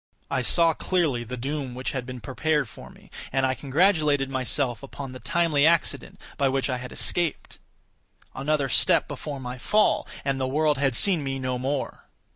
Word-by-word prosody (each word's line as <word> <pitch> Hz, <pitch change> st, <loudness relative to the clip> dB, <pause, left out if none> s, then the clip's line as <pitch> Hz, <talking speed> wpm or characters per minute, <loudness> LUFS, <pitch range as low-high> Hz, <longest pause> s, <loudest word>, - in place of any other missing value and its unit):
I 130 Hz, -, +1 dB
saw 165 Hz, +5 st, +3 dB
clearly 155 Hz, -10 st, 0 dB
the 125 Hz, +2 st, -6 dB
doom 135 Hz, 0 st, -4 dB
which 130 Hz, +1 st, -3 dB
had 125 Hz, -2 st, -4 dB
been 125 Hz, -1 st, -7 dB
prepared 150 Hz, +3 st, 0 dB
for 95 Hz, -, -12 dB
me, -, -, -19 dB, 0.2 s
and 135 Hz, 0 st, +2 dB
congratulated 145 Hz, 0 st, +2 dB
myself 130 Hz, -1 st, -1 dB
upon 140 Hz, -1 st, -8 dB
the 130 Hz, -, -9 dB
timely 165 Hz, -3 st, +1 dB
accident 165 Hz, +1 st, +1 dB, 0.2 s
by 140 Hz, -1 st, +3 dB
which 135 Hz, 0 st, 0 dB
I 125 Hz, -, -1 dB
had 125 Hz, 0 st, -8 dB
escaped. 175 Hz, -3 st, -1 dB, 0.7 s
Another 140 Hz, +1 st, 0 dB
step 130 Hz, -, +3 dB
before 145 Hz, -2 st, -6 dB
my 125 Hz, 0 st, -6 dB
fall, 210 Hz, +10 st, +2 dB, 0.2 s
and 135 Hz, -1 st, 0 dB
the 130 Hz, -, 0 dB
world 150 Hz, +1 st, +1 dB
had 135 Hz, -3 st, +1 dB
seen 175 Hz, -, +5 dB
me 135 Hz, -1 st, -2 dB
no 130 Hz, -1 st, -2 dB
more. 135 Hz, +2 st, -3 dB
135 Hz, 175 wpm, -25 LUFS, 130-155 Hz, 0.7 s, seen